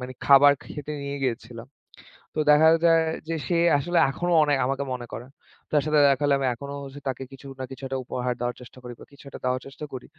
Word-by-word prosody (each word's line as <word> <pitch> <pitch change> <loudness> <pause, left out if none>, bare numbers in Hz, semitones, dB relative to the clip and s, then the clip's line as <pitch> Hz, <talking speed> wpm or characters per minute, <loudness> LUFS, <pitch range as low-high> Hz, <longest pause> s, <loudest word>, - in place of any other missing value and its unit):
মানে 125 0 -6
খাবার 140 +1 +7
খেতে 150 0 -7
নিয়ে 140 0 -4
গিয়েছিলাম। 115 -2 -4 0.7
তো - - -2
দেখা 155 +2 +6 0.2
যায় 165 -1 +5 0.3
যে 165 - -2
সে 175 - +1 0.2
আসলে 175 +5 -1
এখনো 175 +6 -2
অনেক 145 -2 +2
আমাকে 135 +1 -1
মনে 120 -1 -6
করে। 120 - -6 0.5
তার 150 -2 +3
সাথে 155 -1 +3
দেখা 135 +1 +1
হলে 140 -1 +3
আমি 135 - 0
এখনো 140 +4 -8
হচ্ছে 140 +1 -9
তাকে 130 0 -3
কিছু 135 +1 -12
না - - -4
কিছু 135 - -10
একটা 135 0 -3
উপহার 125 0 -2
দেওয়ার 120 0 -2
চেষ্টা 125 +1 -14
করি 125 0 -8
বা - - -12
কিছু 140 - -17
একটা - - -10
দেওয়ার 125 0 0
চেষ্টা 140 +2 -9
করি। 125 - -7
135 Hz, 225 wpm, -25 LUFS, 125-145 Hz, 0.7 s, খাবার